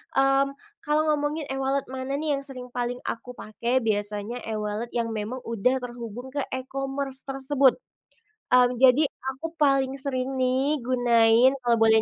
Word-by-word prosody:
mmm, 270 +1 +3 0.3
kalau 300 +1 +2
ngomongin 295 +1 -1
e-wallet 270 +1 0
mana 265 +1 -3
nih 295 -1 0
yang - - -10
sering 255 -2 -8
paling 245 0 -3
aku 250 +2 -5
pakai, 235 +3 -1
biasanya 210 +2 -2
e-wallet 215 +1 -3
yang 230 -1 0
memang 220 +4 -4
udah 230 +3 +1
terhubung 240 +1 -7
ke 285 - -3 0.2
e-commerce 270 +1 -4
tersebut. 270 0 +2 0.7
Mmm, 250 0 +5
jadi 265 +4 +6 0.2
aku 320 +5 -6
paling 270 -2 +3
sering 265 -1 -2
nih 265 +3 +1
gunain 240 0 +4
kalau 235 -1 +2
boleh 220 0 +5
255 Hz, 145 wpm, -26 LUFS, 235-275 Hz, 0.7 s, jadi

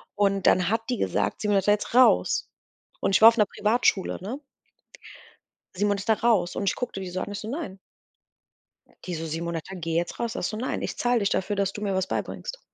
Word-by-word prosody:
Und 200 -2 +1
dann 180 0 +4
hat 225 +2 -1
die 245 - 0
gesagt: - - -1
„Simonetta, 205 -1 +2
jetzt 210 - -3
raus!“ 165 - +4 0.5
Und 195 - +1
ich - - +4
war 225 - +11
auf 230 - -2
'ner 210 - +5
Privatschule, 210 -2 +1
ne? 240 +9 -5 1.4
„Simonetta 205 +2 +1
raus!“ 215 -6 +1
und - - -2
ich - - +2
guckte 245 -6 -4
die 185 - -5
so 185 +1 -4
an. 205 - -5
Ich 205 - -5
so: 220 - -6
„Nein.“ 265 - -5 1.3
Die 180 - -4
so: 165 0 -4
„Simonetta, 165 +3 -4
geh 165 -1 -3
jetzt 170 0 -2
raus.“ 235 0 -2
Ich, - - -2
so: 215 - -4
„Nein, 250 +4 -3
ich - - -4
zahle 245 -1 +2
dich 200 - +1
dafür, 205 +1 -1
dass 195 -1 0
du 210 - -7
mir 200 -2 -1
was 190 -1 -1
beibringst.“ - - -4
205 Hz, 205 wpm, -26 LUFS, 185-225 Hz, 1.4 s, war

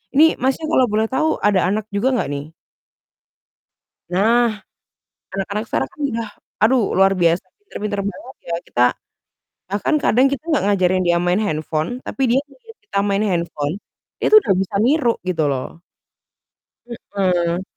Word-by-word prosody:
Ini, 310 +3 +7 0.2
Masnya, 270 +5 0
kalau 260 -5 +4
boleh 220 +1 0
tahu 310 +4 +1 0.2
ada 205 -2 +4
anak 210 +2 -1
juga 250 +6 +1
nggak 220 - -1
nih? 145 +3 -6 1.6
Nah. 220 +2 +2 0.7
Anak-anak 200 +3 -3
sekarang - - -1
kan - - -18
udah 230 -2 -3 0.4
aduh 250 0 +4
luar 195 0 +5
biasa 175 0 +2 0.2
pinter-pinter 205 -1 -3
banget 205 +6 -6
ya, 170 - -1
kita 120 - -4 0.9
bahkan 205 - -1
kadang 260 -1 +3
kita 280 +2 -4
nggak 310 -4 +1
ngajarin 185 -2 +2
dia 175 -1 +2
main 180 +4 +1
handphone 155 -3 -2 0.2
tapi 270 - -5
dia 250 - +3
ngeliat 450 - -18
kita 200 - -4
main 200 +1 0
handphone, 170 -5 -1 0.5
itu - - +1
udah 410 - +4
bisa 195 - -4
niru, 270 -4 +2
gitu 160 -5 0
loh. 135 +5 -4 1.3
Mhm. 180 -2 +1
200 Hz, 145 wpm, -20 LUFS, 175-245 Hz, 1.6 s, Ini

